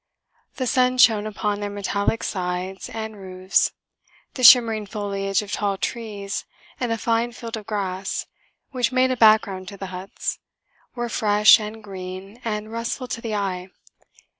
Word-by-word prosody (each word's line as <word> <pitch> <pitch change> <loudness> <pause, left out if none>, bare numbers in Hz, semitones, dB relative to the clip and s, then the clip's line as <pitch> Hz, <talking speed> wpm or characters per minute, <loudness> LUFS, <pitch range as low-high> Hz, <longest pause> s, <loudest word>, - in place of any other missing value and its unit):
The 255 - -2
sun 255 +1 +2
shone 220 -4 +5
upon 210 -1 -2
their 205 0 -3
metallic 200 +2 -1
sides 185 0 -3
and 220 -1 -5
roofs. 185 +1 +1 0.6
The 255 - -6
shimmering 230 -4 +7
foliage 200 -1 -1
of 205 - -9
tall 200 -2 -1
trees, 205 -3 -4 0.4
and 245 -2 -1
a 230 - 0
fine 230 +2 0
field 230 -1 -6
of 215 -2 -8
grass, 190 -2 -3 0.5
which 250 -3 0
made 255 0 +3
a - - +1
background 215 -5 +4
to 200 - -8
the 195 - -6
huts, 185 +2 -4 0.6
were 240 -1 -2
fresh 210 -2 +5
and 215 +1 -7
green 190 +2 -8
and 215 -1 -3
restful 230 +2 -3
to 230 - -4
the 225 -2 -3
eye. 190 -2 -3
210 Hz, 155 wpm, -23 LUFS, 195-230 Hz, 0.6 s, shimmering